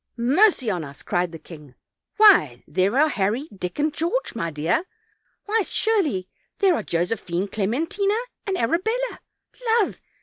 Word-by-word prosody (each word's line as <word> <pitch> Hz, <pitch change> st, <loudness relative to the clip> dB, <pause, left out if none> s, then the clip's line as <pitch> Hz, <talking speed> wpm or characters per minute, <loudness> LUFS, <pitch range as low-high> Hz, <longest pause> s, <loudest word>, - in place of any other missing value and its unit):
"Mercy 270 Hz, -, +3 dB
on 175 Hz, -4 st, -2 dB
us!" 140 Hz, -1 st, -10 dB
cried 175 Hz, -1 st, -1 dB
the 165 Hz, -, -8 dB
king, 150 Hz, -5 st, -13 dB, 0.4 s
"why, 360 Hz, -, +6 dB
there 195 Hz, +7 st, +1 dB
are 305 Hz, +2 st, +5 dB
Harry, 230 Hz, +2 st, -1 dB
Dick 180 Hz, -2 st, -5 dB
and 300 Hz, 0 st, 0 dB
George, 345 Hz, +12 st, -1 dB
my 170 Hz, -7 st, -2 dB
dear! 160 Hz, -, 0 dB, 0.6 s
why, 435 Hz, +2 st, +1 dB
surely 360 Hz, -, 0 dB, 0.3 s
there 390 Hz, -3 st, +4 dB
are -, -, -1 dB
Josephine, 175 Hz, +1 st, -2 dB
Clementina 315 Hz, -, -1 dB, 0.3 s
and 385 Hz, -2 st, 0 dB
Arabella, 440 Hz, -, -1 dB, 0.6 s
love! 415 Hz, -, -1 dB
240 Hz, 140 wpm, -23 LUFS, -, 0.6 s, why